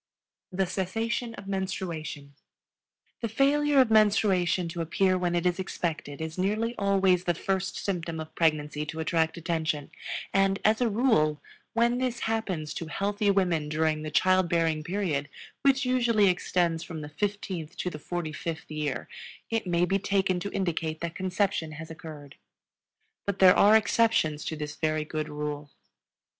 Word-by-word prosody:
The 190 +1 +1
Cessation 225 +6 -2
of 195 - -10
Menstruation. 170 -7 -4 0.9
The 230 - -1
failure 285 +4 +3
of 255 -4 +4
menstruation 200 -5 +3
to 170 0 -4
appear 185 +3 +2
when 175 -1 0
it 175 0 0
is 180 +1 +1
expected 160 -6 -3
is 160 +2 -5
nearly 215 +5 0
always 190 -3 +3
the 175 - +1
first 190 +2 -2
symptom 170 -4 -3
of 155 0 -7
pregnancy 150 -2 +1
to 160 +1 -5
attract 160 0 +1
attention, 160 -3 -2 0.4
and, 195 0 +3
as 220 +3 +4
a 240 - +3
rule, 200 - +2 0.3
when 235 +1 +2
this 250 -2 -2
happens 195 -9 -2
to 165 - -5
healthy 205 +4 0
women 180 -6 +1
during 155 0 +1
the 155 - -4
child 185 +3 +3
bearing 165 -2 +1
period 160 -5 -1 0.3
which 275 -1 +3
usually 235 -5 +3
extends 175 -2 +1
from 165 -2 -7
the 150 - -7
fifteenth 185 -1 -4
to 180 - -2
the 150 - -7
forty 175 0 -4
fifth 165 -2 -5
year 150 -3 -3 0.4
it 225 -4 -1
may 175 0 +2
be 195 +2 +1
taken 190 -2 +1
to 200 +3 -4
indicate 165 -4 -2
that 170 0 -3
conception 185 -3 -1
has 160 +1 -8
occurred. 150 -3 -10 0.9
But 200 -1 -1
there 185 -1 +7
are 210 +2 +7
exceptions 215 -9 +2
to 160 - -3
this 150 -1 -5
very 155 -1 0
good 155 0 -3
rule. 150 0 -4
180 Hz, 160 wpm, -28 LUFS, 160-200 Hz, 0.9 s, there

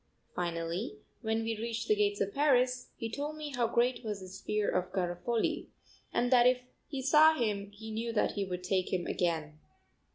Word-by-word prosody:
Finally, 170 - -2 0.2
when 225 0 0
we 225 0 -1
reached 230 0 -3
the - - +5
gates 205 -1 +1
of 200 0 -1
Paris, 255 -3 +2
he 230 - -3
told 290 +6 -4
me 300 -1 -5
how 240 -2 +2
great 240 +2 +1
was 210 -3 -3
his 185 0 -9
fear 210 -1 0
of 180 0 0
Garofoli, 185 +6 -1 0.4
and 245 +1 +1
that 245 -1 +7
if 250 0 +3 0.2
he 275 -3 -4
saw 310 +4 +7
him 205 -6 -1
he 220 +2 -9
knew 230 +2 -2
that 220 - +2
he 200 - -2
would 180 -1 -4
take 185 0 0
him 180 -2 0
again. 155 -3 -1
220 Hz, 190 wpm, -32 LUFS, 190-245 Hz, 0.4 s, that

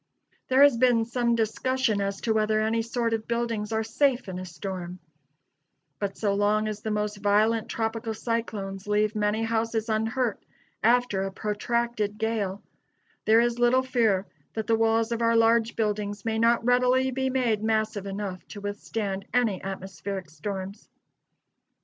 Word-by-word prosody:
There 260 +2 +5
has 285 -4 +6
been 235 -2 +4
some 235 0 +1
discussion 230 0 0
as 195 0 -2
to 225 - +1
whether 215 0 +2
any 220 +1 +1
sort 230 0 -1
of 220 -1 -2
buildings 230 -2 -2
are 220 0 0
safe 250 +2 +1
in 185 -1 -5
a 185 - -6
storm: 180 -2 -6 1.0
but 200 -1 -3
so 205 -2 +1
long 210 +1 +2
as 210 -1 -4
the 220 - -3
most 210 -1 -1
violent 210 +2 +2
tropical 225 0 -2
cyclones 205 -4 -3
leave 210 +1 +2
many 210 +1 +1
houses 225 0 -1
unhurt 225 +2 0 0.4
after 235 -3 +3
a 195 0 -2
protracted 215 +1 -1
gale, 210 -3 -2 0.6
there 220 +1 +6
is 240 0 0
little 245 +2 +4
fear 225 -7 +1 0.3
that 220 -1 -2
the 230 - +1
walls 225 0 +2
of 235 0 -1
our 230 0 +3
large 230 0 +3
buildings 210 -2 -2
may 220 -1 0
not 230 0 +3
readily 250 +1 +3
be 265 +1 -1
made 245 -5 +1
massive 215 -2 0
enough 195 -2 -5
to 205 - -9
withstand 205 -1 -4
any 225 -7 +2
atmospheric 190 -2 -6
storms. 190 +5 -6
220 Hz, 155 wpm, -26 LUFS, 205-235 Hz, 1.0 s, has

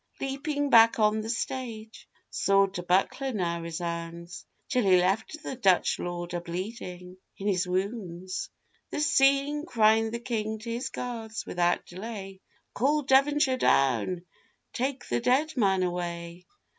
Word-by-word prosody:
Leaping 285 +1 -2
back 230 0 +7
on 215 0 +2
the 220 - -6
stage, 230 -2 -5 0.2
sword 195 -1 +2
to 180 - -3
buckler 190 +9 +1
now 170 -6 -2
resounds, 170 0 -5 0.2
Till 250 - +1
he 190 -2 +5
left 205 - 0
the 270 - -4
Dutch 195 -7 +2
Lord 175 0 -4
a 175 - -2
bleeding 180 0 -6 0.2
in 200 - -4
his 180 -2 +1
wounds: 185 -1 -3 0.4
This 300 - 0
seeing, 280 +2 +3
cries 225 -7 +3
the 235 - -3
King 220 -3 -3
to 225 +2 -7
his 245 +3 -3
guards 225 -3 -5
without 175 0 0
delay, 195 0 -8 0.3
'Call 290 +6 +1
Devonshire 275 0 +3
down,—take 180 - -1
the 120 - 0
dead 295 - +1
man 195 -6 +2
away! 175 -1 -4
210 Hz, 135 wpm, -28 LUFS, 180-250 Hz, 0.4 s, back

